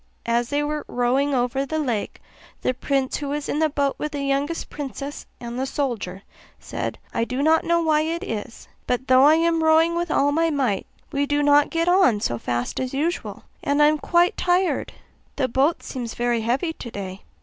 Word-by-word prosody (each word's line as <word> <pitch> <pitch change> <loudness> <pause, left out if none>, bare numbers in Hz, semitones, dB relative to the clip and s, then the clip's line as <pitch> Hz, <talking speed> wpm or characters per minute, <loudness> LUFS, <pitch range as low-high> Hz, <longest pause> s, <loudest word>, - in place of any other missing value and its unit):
As 235 +1 +1
they 290 +1 0
were 300 0 -2
rowing 260 +3 +1
over 250 +2 0
the 315 +3 -3
lake, 245 -9 -2 0.4
the 255 - +1
prince 265 +1 -1
who 285 -2 -4
was 295 0 -3
in 295 - -1
the 315 -1 +3
boat 280 -1 0
with 300 0 -3
the 285 -1 -3
youngest 280 +4 -1
princess 285 0 -6
and 240 +1 -6
the 265 - -1
soldier 220 -10 -3 0.4
said, - - -4 0.2
'I 230 - 0
do 255 +3 -2
not 320 +1 +4
know 340 0 +2
why 310 -1 +3
it 330 +2 -2
is, 220 +1 -6 0.2
but 250 +1 -1
though 260 +1 +6
I 305 +2 +7
am 330 0 +2
rowing 320 +1 +4
with 345 0 -1
all 285 -1 +2
my 330 +2 +2
might 260 -10 0 0.2
we 285 0 0
do 290 0 +1
not 290 0 +5
get 330 +1 0
on 355 - +4
so 120 - -2
fast 120 +1 -2
as 260 0 -3
usual, 330 +5 -2 0.2
and 285 -2 +1
I 295 - +7
am 305 0 0
quite 345 +2 +3
tired: 360 +1 +1 0.4
the 270 -3 +1
boat 270 +7 +1
seems 240 -4 -5
very 240 -1 0
heavy 260 +9 0
today. 200 -8 -7
280 Hz, 200 wpm, -23 LUFS, 245-315 Hz, 0.4 s, I